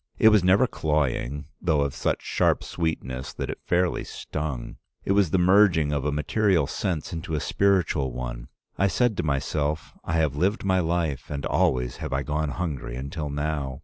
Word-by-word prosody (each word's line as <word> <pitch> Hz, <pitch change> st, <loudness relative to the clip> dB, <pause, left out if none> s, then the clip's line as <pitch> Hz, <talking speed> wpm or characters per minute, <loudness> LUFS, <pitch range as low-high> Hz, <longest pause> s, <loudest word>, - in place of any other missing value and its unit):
It 110 Hz, -, +7 dB
was 105 Hz, -4 st, +4 dB
never 95 Hz, +7 st, +5 dB
cloying, 75 Hz, -, -1 dB, 0.2 s
though 80 Hz, -5 st, +2 dB
of 70 Hz, -1 st, 0 dB
such -, -, -1 dB
sharp -, -, +1 dB
sweetness 65 Hz, -6 st, -3 dB
that -, -, -4 dB
it -, -, -8 dB
fairly 90 Hz, 0 st, +1 dB
stung. 75 Hz, -6 st, -5 dB, 0.3 s
It -, -, 0 dB
was 100 Hz, -3 st, +4 dB
the 95 Hz, -, +2 dB
merging 90 Hz, -4 st, +4 dB
of 70 Hz, -1 st, -1 dB
a 75 Hz, -, +1 dB
material 85 Hz, +3 st, +2 dB
sense 80 Hz, +3 st, -3 dB
into 80 Hz, -1 st, -3 dB
a -, -, 0 dB
spiritual 90 Hz, -8 st, +1 dB
one. -, -, -5 dB, 0.3 s
I 100 Hz, -, +4 dB
said 120 Hz, +2 st, +1 dB
to -, -, +1 dB
myself, 75 Hz, +1 st, -1 dB
'I -, -, -3 dB
have 80 Hz, -4 st, +1 dB
lived 95 Hz, +8 st, 0 dB
my 95 Hz, -1 st, +3 dB
life 85 Hz, -5 st, -1 dB
and 70 Hz, -1 st, -4 dB
always 60 Hz, -1 st, +1 dB
have -, -, -5 dB
I 65 Hz, +1 st, 0 dB
gone 75 Hz, 0 st, -1 dB
hungry 75 Hz, -7 st, -4 dB
until 70 Hz, +4 st, -4 dB
now. 70 Hz, -2 st, -3 dB
75 Hz, 180 wpm, -25 LUFS, 70-90 Hz, 0.3 s, It